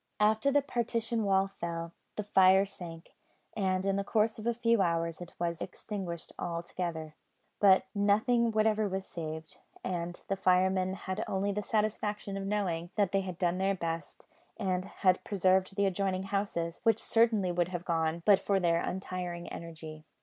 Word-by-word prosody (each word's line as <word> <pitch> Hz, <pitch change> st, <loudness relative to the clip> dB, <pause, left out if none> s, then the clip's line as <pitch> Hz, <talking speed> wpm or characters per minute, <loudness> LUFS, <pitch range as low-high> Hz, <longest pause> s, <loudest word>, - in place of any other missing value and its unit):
After 220 Hz, +5 st, +3 dB
the 285 Hz, 0 st, +3 dB
partition 230 Hz, -3 st, -1 dB
wall 195 Hz, 0 st, +3 dB
fell, 170 Hz, 0 st, -3 dB, 0.2 s
the 210 Hz, -, -2 dB
fire 190 Hz, -1 st, +5 dB
sank, 170 Hz, -4 st, -10 dB, 0.4 s
and 190 Hz, -2 st, 0 dB
in 195 Hz, 0 st, +1 dB
the 200 Hz, -, 0 dB
course 215 Hz, +2 st, +1 dB
of 215 Hz, -, -5 dB
a 235 Hz, -, +3 dB
few 230 Hz, -2 st, +3 dB
hours 165 Hz, -1 st, 0 dB
it 175 Hz, -, -9 dB
was 170 Hz, -1 st, -2 dB
extinguished 180 Hz, -5 st, -5 dB
altogether. 170 Hz, -2 st, -4 dB, 0.5 s
But 195 Hz, -2 st, +6 dB
nothing 220 Hz, +4 st, +3 dB
whatever 215 Hz, -1 st, +2 dB
was 190 Hz, 0 st, -3 dB
saved, 160 Hz, -1 st, -7 dB, 0.2 s
and 175 Hz, -1 st, -3 dB
the 195 Hz, -, 0 dB
firemen 185 Hz, 0 st, +2 dB
had 190 Hz, +2 st, -4 dB
only 195 Hz, +1 st, 0 dB
the 210 Hz, +1 st, -2 dB
satisfaction 210 Hz, -1 st, -1 dB
of 195 Hz, 0 st, -3 dB
knowing 180 Hz, -5 st, -1 dB
that 200 Hz, -3 st, +2 dB
they 195 Hz, -, +2 dB
had 185 Hz, -3 st, -6 dB
done 175 Hz, 0 st, 0 dB
their 195 Hz, +1 st, +2 dB
best, 165 Hz, -3 st, -5 dB, 0.3 s
and 185 Hz, -3 st, -1 dB
had 185 Hz, -1 st, +1 dB
preserved 190 Hz, -1 st, +2 dB
the 200 Hz, 0 st, +2 dB
adjoining 190 Hz, 0 st, 0 dB
houses, 195 Hz, -4 st, -2 dB
which 225 Hz, -2 st, +4 dB
would -, -, -13 dB
certainly 220 Hz, -6 st, +2 dB, 0.2 s
have 175 Hz, -1 st, -5 dB
gone, 165 Hz, 0 st, 0 dB
but 200 Hz, -2 st, +7 dB
for 195 Hz, -1 st, +1 dB
their 170 Hz, -2 st, +2 dB
untiring 180 Hz, -2 st, -4 dB
energy. 160 Hz, -2 st, -8 dB
190 Hz, 165 wpm, -31 LUFS, 175-205 Hz, 0.5 s, but